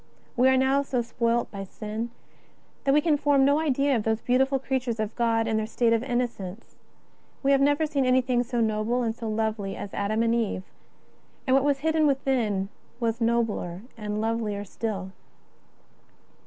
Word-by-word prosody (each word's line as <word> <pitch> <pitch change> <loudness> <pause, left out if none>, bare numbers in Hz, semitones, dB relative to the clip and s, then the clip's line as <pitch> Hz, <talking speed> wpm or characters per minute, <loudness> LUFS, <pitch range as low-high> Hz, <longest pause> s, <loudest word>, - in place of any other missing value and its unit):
We 255 +2 +5
are 260 - +4
now 265 +2 +3
so 255 -3 -1
spoilt 235 0 0
by 200 -1 -5
sin 215 +4 -5 0.8
that 275 - +4
we 295 +2 +5
can 305 -2 +2
form 280 -2 +3
no 285 +2 +4
idea 280 -2 +2
of 230 - +1
those 220 +1 0
beautiful 265 +3 +2
creatures 260 -3 -2
of 215 0 -2
God 230 -1 +1
in 220 -1 +1
their 215 0 -1
state 230 0 +2
of 225 - +2
inno 245 -1 0
cence. 200 -1 -10 0.7
We 275 - +3
have 275 -1 +4
never 290 +3 +3
seen 290 -3 0
anything 255 -1 +2
so 240 -1 -1
noble 220 +3 0
and 225 -1 -1
so 230 -2 -5
lovely 215 -2 -2
as 200 - -7
Adam 215 +3 0
and 230 0 +2
Eve; 225 -5 -1 0.8
and 260 -1 +3
what 270 - +4
was 280 -1 +1
hidden 315 0 +2
within 240 -8 0 0.3
was 230 0 -1
nobler 225 -6 0
and 210 -2 -4
lovelier 220 -2 -1
still. 195 -2 -4
235 Hz, 180 wpm, -26 LUFS, 220-265 Hz, 0.8 s, We